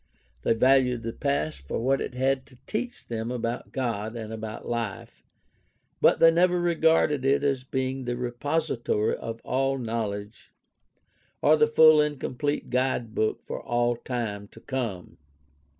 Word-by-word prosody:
They 115 - +2
valued 125 0 +3
the 115 0 -4
past 80 - -1
for - - -2
what 135 +4 +1
it 125 - -5
had 130 +1 0
to 130 - -18
teach 240 +3 -4
them 115 0 -3
about 120 -1 -3
God 115 -3 -2
and 110 -1 -6
about 110 -1 -6
life; 115 -4 -4 0.8
but - - +5
they 165 - +7
never 175 +1 +3
regarded 160 -4 +2
it 135 +1 +2
as 135 -3 0
being 130 0 -3
the 120 0 -2
repository 125 -2 -1
of 115 0 -7
all 135 +1 0
knowledge 110 -3 -4 0.9
or 155 - +6
the 150 -1 +4
full 155 0 +7
and 150 -2 -1
complete 145 +3 -2
guidebook 120 -4 0
for - - -5
all 120 0 +1
time 115 -5 -4
to - - -16
come. 115 -9 -5
125 Hz, 150 wpm, -26 LUFS, 115-140 Hz, 0.9 s, they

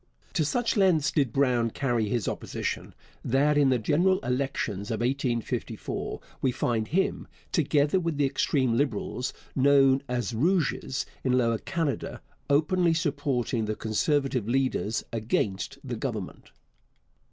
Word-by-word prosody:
To 160 - +2
such 230 +10 0
lengths 185 -8 +3
did 140 -7 +1
Brown 125 -3 +2
carry 120 -4 0
his 115 -2 -1
opposition, - - -4 0.3
that 140 +4 +2
in 145 -2 +4
the 130 - +3
general 170 - +2
elections 125 -6 -2
of 110 - -2
1854 125 -2 -2 0.2
we 130 - +2
find 115 -3 -1
him, 185 - 0 0.2
together 150 +1 +2
with 165 -4 -2
the 145 - +3
extreme 130 -2 +1
Liberals, 125 -1 -1 0.2
known 135 -1 +5
as 120 -2 -1
Rouges, 150 -1 0 0.2
in 130 - +1
Lower 115 -3 +2
Canada, 165 -6 -2 0.3
openly 165 +4 +3
supporting 140 -7 0
the 110 0 -2
Conservative 125 +1 0
leaders 130 -4 0
against 110 +2 -1
the 125 -4 -4
Government. 110 -7 -5
135 Hz, 130 wpm, -27 LUFS, 115-145 Hz, 0.3 s, known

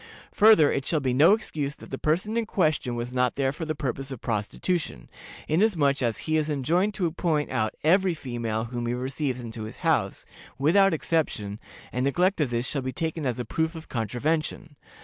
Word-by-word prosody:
Further, 210 -9 +6
it 135 - -1
shall 160 - +1
be 130 -3 0
no 155 +9 +6
excuse 150 -10 -2
that - - -14
the 135 - -4
person 180 +8 0
in 230 -2 0
question 155 - 0
was 120 +1 -4
not 125 -1 +1
there 135 -1 +1
for 160 +3 -6
the 155 0 -2
purpose 135 -1 -3
of 130 -4 -6
prostitution, 110 - -2 0.4
inasmuch 155 -6 +2
as 115 -3 0
he 155 0 +1
is 155 0 0
enjoined 170 +9 +1
to 180 -5 0
point 155 -3 -1
out 110 0 -1
every 180 +2 +3
female 120 -6 -3
whom 120 0 -4
he 120 - 0
receives 130 0 -2
into 115 -2 -6
his 110 - -9
house, - - +1 0.3
without 195 +8 +4
exception, 110 -11 -1 0.3
and 125 +2 -1
neglect 175 +6 +2
of 145 - +1
this 120 +1 -1
shall 140 - -2
be 130 0 -3
taken 160 +2 -3
as 125 - -1
a 125 - -3
proof 160 +8 -1
of 160 0 -9
contravention. 150 - -2
145 Hz, 195 wpm, -26 LUFS, 125-165 Hz, 0.4 s, Further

